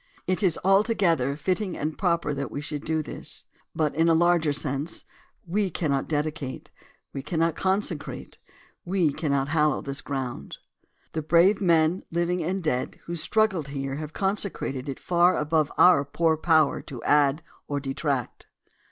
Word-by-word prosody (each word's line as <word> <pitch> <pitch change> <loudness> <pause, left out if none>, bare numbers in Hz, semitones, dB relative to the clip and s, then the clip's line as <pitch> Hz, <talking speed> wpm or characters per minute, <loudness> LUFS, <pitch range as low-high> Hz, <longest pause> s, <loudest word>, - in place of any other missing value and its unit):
It 185 +2 0
is 180 -5 +2
altogether 190 - +3
fitting 185 +4 -1
and 155 +1 -3
proper 170 -5 0
that 140 -2 -3
we - - -5
should 145 0 -5
do 160 -1 -1
this. - - -8 0.3
But, 155 -2 +1
in 165 +2 +3
a 165 - +5
larger 170 -2 +3
sense, 145 +2 -3 0.4
w^e 195 +2 0
cannot 140 -5 -1
dedicate 150 -3 -3 0.2
— - - -39
we 135 - -4
cannot 165 +3 0
con 190 +2 +1
secrate 160 -8 -7 0.2
— - - -31
we 170 -7 +2
cannot 140 -3 -1
hallow 150 -2 +2
this 140 0 -4
ground. 130 - -5 0.6
The 160 - -1
brave 175 +6 +4
men, 170 -1 +3
living 170 +1 0
and 185 +3 -2
dead, 130 -5 -2
who 170 - -6
struggled 190 -2 +1
here 135 -1 -4
have 155 0 -6
consecrated 190 -9 -2
it 135 - -5
far 175 +1 +3
above 155 0 +1
our 180 -6 +6
poor 160 +3 +1
power 155 -2 +3
to 125 -4 -9
add 145 +1 +3 0.2
or 145 -1 -1
detract. 135 -2 -3
155 Hz, 160 wpm, -26 LUFS, 140-175 Hz, 0.6 s, our